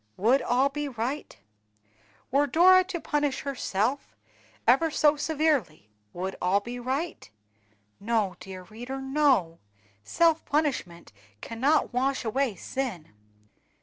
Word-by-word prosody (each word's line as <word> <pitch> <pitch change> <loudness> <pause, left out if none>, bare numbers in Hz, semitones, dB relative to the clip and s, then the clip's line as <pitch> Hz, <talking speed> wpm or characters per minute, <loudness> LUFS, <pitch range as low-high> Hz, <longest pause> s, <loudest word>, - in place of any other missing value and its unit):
Would 240 +8 +3
all 255 +3 +2
be 295 +1 -4
right? 250 - -4 0.9
Were 285 +2 +3
Dora 370 +6 +6
to 360 -2 -4
punish 290 -3 -1
herself 255 - -2 0.5
ever 270 +8 +4
so 300 -1 +3
severely, 290 - -1 0.2
would 190 - -4
all 185 +3 +3
be 240 +4 -7
right? 265 - -4 0.7
No, 210 -3 0
dear 190 -1 -9
reader, 240 +7 -7
no! 265 - +1 0.4
self 325 - +2
punishment 255 - -2 0.3
cannot 260 - 0
wash 265 +1 0
away 245 0 0
sin. 190 - -5
260 Hz, 115 wpm, -27 LUFS, 205-295 Hz, 0.9 s, Dora